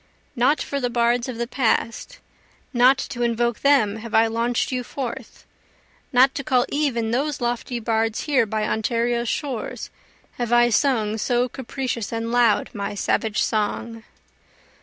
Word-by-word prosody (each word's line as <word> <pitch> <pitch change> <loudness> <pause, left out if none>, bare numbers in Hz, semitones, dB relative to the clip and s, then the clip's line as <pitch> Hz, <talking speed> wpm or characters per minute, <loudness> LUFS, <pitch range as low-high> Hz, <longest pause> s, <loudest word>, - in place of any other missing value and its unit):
Not 260 +5 +2
for 280 - -3
the 250 -2 -1
bards 240 +1 +1
of 245 - -5
the 235 - -1
past, 245 - -1 0.6
not 250 +2 +5
to 260 -2 -5
invoke 235 0 0
them 230 -8 +3
have 230 +1 -5
I 225 - +6
launch'd 230 +3 -1
you 250 -1 -2
forth, 250 -1 -7 0.7
Not 260 +2 +5
to 275 - -4
call 250 -1 +2
even 250 -7 0
those 280 +4 -1
lofty 240 0 -2
bards 225 -1 0
here 260 -6 +2
by 215 0 -1
Ontario's 235 +1 0
shores, 260 -7 -4 0.5
Have 240 -1 -2
I 240 0 +5
sung 220 -3 +1
so 245 +2 +1
capricious 255 -3 -4
and 230 0 -3
loud 240 -3 +3
my 200 0 -4
savage 215 +1 0
song. 225 +1 -2
240 Hz, 150 wpm, -23 LUFS, 225-255 Hz, 0.7 s, I